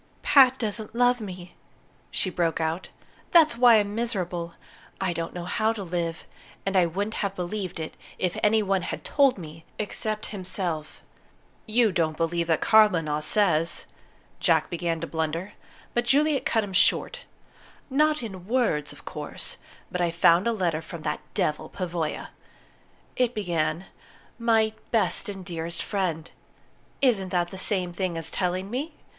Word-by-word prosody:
"Pat 265 -2 +6
doesn't 220 -1 -4
love 245 0 +3
me," 180 -3 -8 0.6
she 185 - -1
broke 170 -2 0
out. 160 +3 -2 0.4
"That's 320 -7 +6
why 240 -1 +7
I'm 205 -1 +2
miserable. 180 -7 -2 0.4
I 185 -2 0
don't 165 0 -3
know 175 -1 -6
how 220 +4 +1
to 210 -3 -5
live. 170 -2 -3 0.4
And 195 0 -1
I 180 -2 +5
wouldn't 200 +6 -2
have 200 -1 -1
believed 180 -1 -4
it 160 - -5 0.2
if 180 -1 -1
any 215 +1 +4
one 195 -1 +1
had - - -5
told 275 -4 +3
me 160 -2 -10
except 215 0 -2
himself." 180 -5 -4 0.6
"You 225 0 +3
don't 160 -3 0
mean 170 -1 -1
that 160 -2 +2
Claremanagh 165 -9 +4
says 165 -3 +2 0.3
" - - -33
Jack - - +2
began 170 -1 -1
to - - -2
blunder; 165 +3 -3 0.4
but 240 0 +1
Juliet 285 +3 +3
cut 225 -2 +2
him 200 -2 -6
short. 485 - +2 0.7
"Not 300 0 +2
in 190 -5 -7
words, 225 - +1
of - - -14
course. - - -5 0.3
But 180 - -2
I 175 - +2
found 170 +3 +4
a - - +3
letter 175 -7 0
from 165 0 -9
that 150 - -1 0.2
devil, 150 - 0
Pavoya. 170 -4 -3 0.9
It 245 -1 +1
began, 175 -3 -1 0.5
'My 225 -2 +3 0.2
Best 210 -3 +1
and 195 -2 -7
Dearest 170 -1 -4
Friend'. 175 -6 -2 0.7
Isn't 205 -8 +3
that 175 -1 0
the 190 - -7
same 185 -3 0
thing 175 -1 -2
as 165 -1 -1
telling 185 +2 -1
me? 295 +6 -3
185 Hz, 155 wpm, -26 LUFS, 170-220 Hz, 0.9 s, why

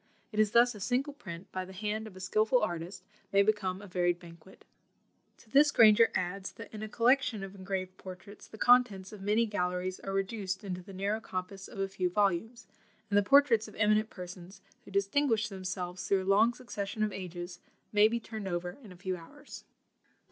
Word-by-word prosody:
It 215 - -3
is 215 -1 +5
thus 240 +3 +5
a 210 - -10
single 255 +8 -1
print, 175 -9 -9
by 185 - -3
the 190 +1 -11
hand 215 +3 -3
of 200 - -12
a - - -10
skilful 215 +6 +2
artist, 180 0 -4 0.3
may 200 0 +5
become 200 -2 0
a - - -9
varied 175 -1 +1
banquet. 170 +1 -15 0.7
To 225 - -21
this 290 +2 +6
Granger 225 -3 +7
adds, 185 +2 -2
that - - -11
in 215 - -7
a 215 - -5
collection 235 -2 +2
of 195 0 -7
engraved 190 -1 -4
portraits, 190 +2 -11
the 220 - -12
contents 230 -6 +4
of 205 - -10
many 210 +4 +2
galleries 180 -3 -2
are 195 - -5
reduced 195 -1 -2
into 185 -2 -4
the 190 - -12
narrow 200 +3 -1
compass 190 0 -6
of 225 - -12
a 195 0 0
few 190 -2 -1
volumes; 205 +5 0 0.5
and - - +2
the 205 - +6
portraits 240 -1 +5
of 215 - -13
eminent 215 +1 +3
persons, 180 +1 -10 0.3
who - - -12
distinguished 210 +2 +1
themselves 185 -1 -5
through 195 -1 +2
a 195 +1 +3
long 225 +4 +4
succession 215 -4 -4
of 210 -2 -1
ages, 175 -1 -6 0.3
may 210 +1 +6
be 235 +2 -1
turned 220 -3 -7
over 175 +2 -3
in 210 - -12
a 180 - -12
few 185 0 -3
hours. 275 - -12
200 Hz, 200 wpm, -31 LUFS, 185-220 Hz, 0.7 s, Granger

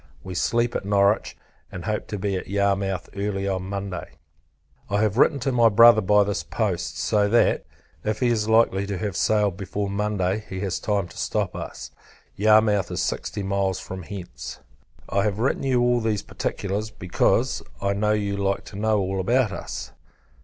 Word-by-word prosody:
We 95 - -6
sleep 120 +6 +1
at - - -1
Norwich, 100 +1 +2 0.3
and - - -7
hope - - -2
to 105 - -4
be 100 0 -1
at 90 - -4
Yarmouth 100 -1 0
early 100 -1 -2
on 95 -1 -2
Monday. 100 -2 -5 0.8
I 100 +1 +1
have 110 +2 +1
written 145 - +5
to 135 - 0
my 120 -2 +5
Brother 115 +1 +7
by 105 +1 +4
this 100 0 -2
post; 85 -7 -2
so 100 +6 +2
that, 120 +3 +3 0.4
if 110 0 -1
he 125 - +2
is 110 -2 0
likely 110 -3 +3
to 100 -1 -3
have 100 0 -3
sailed 105 -1 +2
before 100 +1 -3
Monday, 100 0 -1
he 95 - -5
has 95 -3 -2
time 100 -4 -1
to - - -14
stop - - -1
us. - - -7 0.4
Yarmouth 105 -1 +4
is - - -2
sixty 100 - -3
miles 95 -1 0
from 95 0 -7
hence. 85 -9 -8 0.5
I 100 - +1
have 100 -1 0
written 120 +5 0
you 130 -3 +2
all 120 0 +3
these 110 -3 -1
particulars; 100 +2 -3
because, 90 -4 0 0.2
I 100 0 0
know, 105 +1 +1
you 100 -1 -1
like 100 0 -1
to 105 - -11
know 110 0 +2
all 95 0 -1
about 120 +3 +2
us. 85 - -6
100 Hz, 180 wpm, -24 LUFS, 95-110 Hz, 0.8 s, Brother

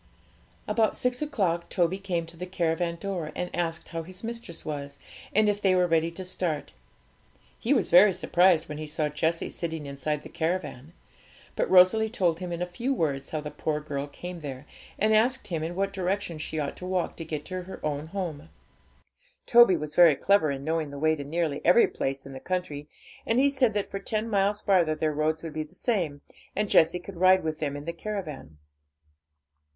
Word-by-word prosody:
About 220 -2 +1
six 250 +1 0
o'clock 195 - -1
Toby 180 +2 +1
came 180 -4 -2
to 165 +1 -12
the 180 +2 -6
caravan 170 -1 0
door, 175 -4 -4
and 180 - -4
asked 165 -2 -2
how 165 - -4
his 185 +4 -11
mistress 230 -7 -6
was, 140 -2 -5 0.3
and 215 +1 +3
if 205 0 +1
they 190 -2 +4
were 180 -1 +4
ready 165 -1 +2
to 185 +3 -8
start. 170 -5 -3 0.9
He 235 - -2
was 275 - +2
very 190 +4 +8
surprised 175 -2 +3
when 150 0 -6
he 155 - -5
saw 150 0 -1
Jessie 160 +3 -1
sitting 160 -3 -4
inside 140 +2 -3
the - - -8
caravan. 160 -4 -3 0.6
But - - 0
Rosalie 190 +4 +6
told 175 -7 +1
him 180 -1 -5
in 170 +1 -2
a - - -1
few 235 +10 -3
words 140 - -1
how 155 - -3
the 150 0 -6
poor 150 0 -2
girl 145 -2 -4
came 175 +4 -8
there, 140 -3 -7 0.3
and 215 +2 +3
asked 250 +5 +2
him 165 -3 -2
in 165 +2 -4
what 195 +1 -1
direction 190 -3 -2
she 155 - -4
ought 145 -2 -3
to 180 - -7
walk 185 -2 -1
to 165 - -5
get 155 -2 -5
to 185 -1 -4
her 185 +1 -9
own 150 0 -2
home. 165 -4 -5 1.0
Toby 235 -7 +7
was 150 -1 -5
very 170 -3 +7
clever 200 0 +3
in 135 -1 -3
knowing 160 0 -1
the 140 - -8
way 155 +2 +2
to 145 - -6
nearly 150 0 -1
every 180 +7 +6
place 135 0 -3
in 135 - -9
the 130 - -7
country, 150 -4 -3 0.4
and 225 - 0
he 280 +2 +4
said 250 -6 +2
that 205 - 0
for 195 - -6
ten 215 +2 -2
miles 205 -1 +1
farther 175 -6 +3
their 155 0 0
roads 155 +2 0
would 165 -2 -6
be 155 - -2
the 155 - -9
same, 170 - -1 0.3
and 210 -1 -1
Jessie 165 +2 +5
could 180 +1 -10
ride 185 +1 +5
with 155 -1 -3
them 145 -2 -2
in 145 - -8
the 170 - -3
caravan. 165 - -6
170 Hz, 205 wpm, -27 LUFS, 155-190 Hz, 1.0 s, very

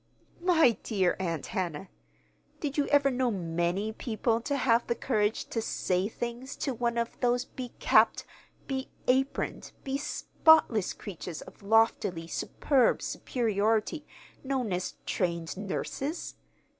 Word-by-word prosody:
"My 320 - +4
dear 190 -5 +1
Aunt 165 -5 -2
Hannah, 180 -1 -3 0.7
did 290 -2 -3
you 290 - +1
ever 285 -1 +4
know 255 0 +1
many 175 +1 -1
people 230 0 -1
to 280 +4 -1
have 235 -3 +3
the 235 - +1
courage 215 -4 0
to 225 - -1
'say 185 -3 0
things' 240 +4 -5
to 270 - -2
one 235 0 -1
of 235 0 -2
those 245 0 +2
becapped, 250 -2 +2 0.4
beaproned, 265 0 -1
bespotless 275 - +3
creatures 175 -4 -7
of - - -15
loftily 205 -5 +2
superb 260 - +1
superiority 225 +4 0 0.4
known 260 -7 -1
as 180 +1 -3
trained 170 -3 -1
nurses? 265 - -4
230 Hz, 120 wpm, -29 LUFS, 195-265 Hz, 0.7 s, My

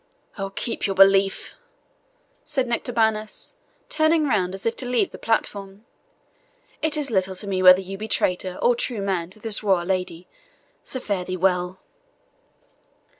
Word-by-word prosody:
"Oh, 195 -2 -4
keep 220 +3 -3
your 195 - -2
belief," 195 0 +4 0.9
said 295 -4 -1
Nectabanus, 220 -2 -1 0.3
turning 315 0 +2
round 190 -7 0
as 195 - -10
if 230 - 0
to 260 - -2
leave 245 -1 +1
the - - -10
platform; 200 -2 -2 1.0
"it 315 -1 +2
is 285 -4 -3
little 190 -2 0
to 195 - -7
me 190 -2 -1
whether 185 0 +8
you 195 +1 -8
be 215 - -5
traitor 185 -3 0
or 245 - +5
true 230 -3 -2
man 180 -4 -1
to 195 - -14
this 215 -1 -2
royal 190 -5 +2
lady 180 -2 -3 0.6
so 260 - -3
fare 200 -6 -2
thee 185 0 -4
well." 180 0 0
195 Hz, 155 wpm, -23 LUFS, 185-230 Hz, 1.0 s, whether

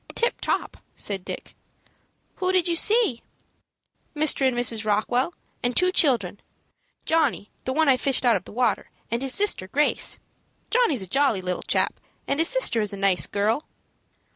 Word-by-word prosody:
"Tip 470 - 0
top," - - -2 0.2
said 195 -3 -2
Dick. - - -7 0.8
"Who 370 0 0
did 370 -2 +2
you 340 - 0
see?" 420 - +3 0.9
"Mr. 295 -3 +2
and 250 -2 -1
Mrs. 230 -2 +1
Rockwell, 220 +7 0 0.3
and 245 0 -1
two 365 0 +3
children, 230 - +1 0.7
Johnny, 300 -10 +1
the 260 - -1
one 315 +2 +2
I 265 -2 +5
fished 265 0 +1
out 240 - +5
of 185 - -3
the - - -11
water, 240 -1 0 0.2
and 235 +1 -1
his 270 -1 +2
sister, 405 - +1
Grace. 290 +9 +1 0.5
Johnny's 450 - +2
a - - -8
jolly 260 -3 +1
little 180 0 -3
chap, - - 0 0.3
and 280 - 0
his 325 - +3
sister - - +2
is 210 -1 -2
a - - -5
nice 195 -2 +1
girl." 215 +8 -1
255 Hz, 165 wpm, -24 LUFS, 210-315 Hz, 0.9 s, I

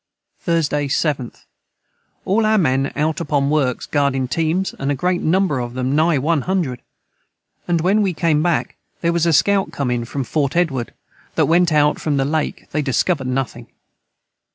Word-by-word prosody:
Thursday 150 -4 0
7th. 140 -3 -2 0.8
All 215 +4 +2
our 215 0 +3
men 135 -6 +1
out 155 +3 -1
upon 145 -3 0
works 135 -5 0
guardin 140 -3 0
teams 165 +6 -1
a 140 +1 0
great 180 +5 0
number 175 -4 +1
of 120 0 -5
them 130 +2 -1
nigh 160 0 +3
100 155 -1 -1 0.5
& - - -46
when 195 +5 +3
we 195 -2 +1
came 160 -3 +1
back 170 0 -1 0.2
their 170 0 +1
was 170 0 +1
a - - +4
scout 195 +2 +2
com 140 -6 -2
in 120 -1 -1
to 135 +4 -4
Fort 140 +2 -1
Edward 140 -9 -1 0.4
that - - +3
went 170 +1 +3
out 150 -1 +2
from 150 -3 0
the 135 - +1
Lake 155 +2 -2
they 150 - 0
discoverd 140 +1 0
nothing. 130 -1 -3
150 Hz, 165 wpm, -20 LUFS, 135-170 Hz, 0.8 s, a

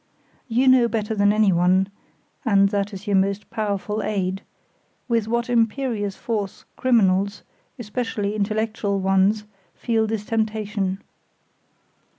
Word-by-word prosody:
You 250 +2 +2
know 255 -2 +6
better 220 -2 -2
than 205 -1 +3
anyone 190 -3 +3 0.6
(and 200 -5 +4
that 200 0 -1
is 195 0 -9
your 205 -2 +1
most 195 +2 -1
powerful 210 -1 -2
aid), 195 -2 -2 0.7
with 230 -3 +1
what 235 +1 0
imperious 230 -3 0
force 210 -4 -4
criminals, 200 -5 +2 0.3
especially 215 -3 -3
intellectual 215 -1 -1
ones, 195 +2 +2 0.3
feel 225 -2 0
this 215 -1 -3
temptation. 210 -3 -2
210 Hz, 115 wpm, -23 LUFS, 200-225 Hz, 0.7 s, know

